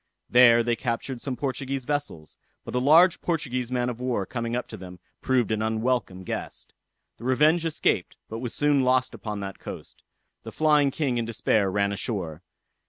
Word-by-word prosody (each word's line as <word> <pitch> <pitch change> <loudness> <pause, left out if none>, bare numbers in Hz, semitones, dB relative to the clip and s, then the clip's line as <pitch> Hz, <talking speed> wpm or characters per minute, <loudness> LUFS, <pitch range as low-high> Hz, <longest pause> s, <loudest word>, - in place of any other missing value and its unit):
There 120 -1 +7
they 120 0 +1
captured 120 +1 -3
some 135 -3 -3
Portuguese 135 0 -3
vessels; 145 - -4 0.3
but - - -7
a 125 - +1
large 160 +7 +5
Portuguese 130 -7 -2
man 125 -1 0
of 125 -1 -4
war 125 -6 -1
coming 115 +2 -3
up 125 - -3
to - - -7
them, 90 -1 -10 0.2
proved 125 -4 +1
an 110 0 0
unwelcome 110 -3 -1
guest. - - -6 0.4
The - - -13
Revenge 150 +6 +3
escaped, 160 - -1
but 115 - -6
was 120 -1 -4
soon 145 -2 +2
lost 130 0 +2
upon 105 -2 -5
that 95 -1 -6
coast. - - -9 0.4
The - - -9
Flying 150 -2 +3
King 135 -3 -1
in 115 - -1
despair 110 -3 +1
run 100 +1 +1
ashore. 95 -6 -4
125 Hz, 175 wpm, -26 LUFS, 110-135 Hz, 0.4 s, There